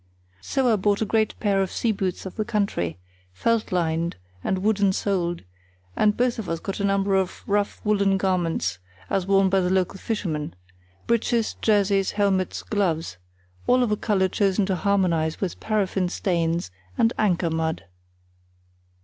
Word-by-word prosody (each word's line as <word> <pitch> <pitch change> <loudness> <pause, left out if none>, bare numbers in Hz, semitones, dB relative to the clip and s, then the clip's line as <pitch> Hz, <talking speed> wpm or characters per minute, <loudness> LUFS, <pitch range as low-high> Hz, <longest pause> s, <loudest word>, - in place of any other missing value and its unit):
So 250 - +1
I - - +3
bought 205 +2 +1
a - - -1
great 220 0 0
pair 200 -3 +2
of 190 - 0
seaboots 195 -6 -1
of 190 - -7
the 215 - -1
country, 200 - -1 0.4
felt 230 - 0
lined 170 -1 0 0.3
and 190 0 -1
wooden 205 -2 +3
soled, 175 -4 -1 0.5
and 210 -1 +2
both 245 -1 +1
of 210 - -5
us 165 0 -1
got 195 +4 -5
a - - -1
number 195 0 +1
of 190 -1 0
rough 205 0 0
woollen 200 -2 +2
garments 180 - 0 0.3
(as 190 -1 0
worn 195 0 +4
by 195 +1 +3
the 180 -1 +1
local 190 0 0
fishermen), 160 - -3 0.5
breeches, 235 0 +1
jerseys, 200 -2 +2
helmets, 195 -3 0
gloves; 165 - -1 0.5
all 250 0 +4
of 230 - 0
a - - +3
colour 200 -3 +1
chosen 195 +1 +1
to 190 -1 0
harmonise 175 -5 +1
with 190 -4 -3
paraffin 195 -4 0
stains 170 - -1 0.3
and 225 +2 +3
anchor 180 -5 +2
mud. 160 -7 -2
195 Hz, 160 wpm, -24 LUFS, 175-210 Hz, 0.5 s, worn